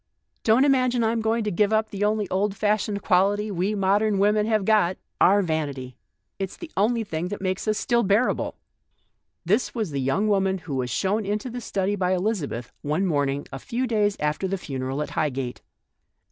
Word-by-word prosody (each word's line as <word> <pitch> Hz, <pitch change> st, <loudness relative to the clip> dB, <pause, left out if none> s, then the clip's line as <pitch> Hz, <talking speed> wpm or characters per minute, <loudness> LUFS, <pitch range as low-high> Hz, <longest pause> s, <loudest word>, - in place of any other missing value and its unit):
Don't 230 Hz, +5 st, +4 dB
imagine 255 Hz, -3 st, +2 dB
I'm 225 Hz, 0 st, +1 dB
going 225 Hz, +1 st, +1 dB
to 210 Hz, -, -1 dB
give 205 Hz, +3 st, +2 dB
up 220 Hz, 0 st, +1 dB
the 200 Hz, 0 st, -3 dB
only 210 Hz, -1 st, +1 dB
old 195 Hz, +1 st, 0 dB
fashioned 210 Hz, -1 st, 0 dB
quality 205 Hz, +3 st, +2 dB
we 195 Hz, +3 st, -1 dB
modern 200 Hz, +1 st, +2 dB
women 210 Hz, +2 st, +3 dB
have 215 Hz, -3 st, +1 dB
got 200 Hz, -4 st, +3 dB
— -, -, -26 dB
our 200 Hz, +2 st, +5 dB
vanity. 140 Hz, -6 st, -3 dB, 0.4 s
It's 195 Hz, -1 st, -4 dB
the 335 Hz, -2 st, -9 dB
only 225 Hz, +3 st, +2 dB
thing 165 Hz, -4 st, -3 dB
that 205 Hz, +2 st, -5 dB
makes 185 Hz, +2 st, -2 dB
us 215 Hz, -1 st, +1 dB
still 240 Hz, -2 st, +2 dB
bearable." 205 Hz, +4 st, +1 dB, 0.9 s
This 210 Hz, +10 st, +1 dB
was 215 Hz, -8 st, -2 dB
the 140 Hz, -1 st, -2 dB
young 135 Hz, +11 st, +1 dB
woman 195 Hz, -2 st, +2 dB
who 165 Hz, -4 st, -7 dB
was 130 Hz, -2 st, -1 dB
shown 195 Hz, -, 0 dB
into 210 Hz, +5 st, -3 dB
the 245 Hz, +1 st, -5 dB
study 200 Hz, -2 st, -1 dB
by 185 Hz, -1 st, +1 dB
Elizabeth 180 Hz, -, -2 dB
one 155 Hz, +7 st, 0 dB
morn 145 Hz, -6 st, +1 dB
ing 140 Hz, +1 st, -4 dB
a 135 Hz, -, -5 dB
few 245 Hz, -, -2 dB
days 210 Hz, -4 st, +1 dB
after 150 Hz, +5 st, -1 dB
the 195 Hz, +1 st, -2 dB
funeral 135 Hz, -3 st, -3 dB
at -, -, -8 dB
Highgate. 135 Hz, -4 st, -2 dB
200 Hz, 195 wpm, -25 LUFS, 170-215 Hz, 0.9 s, our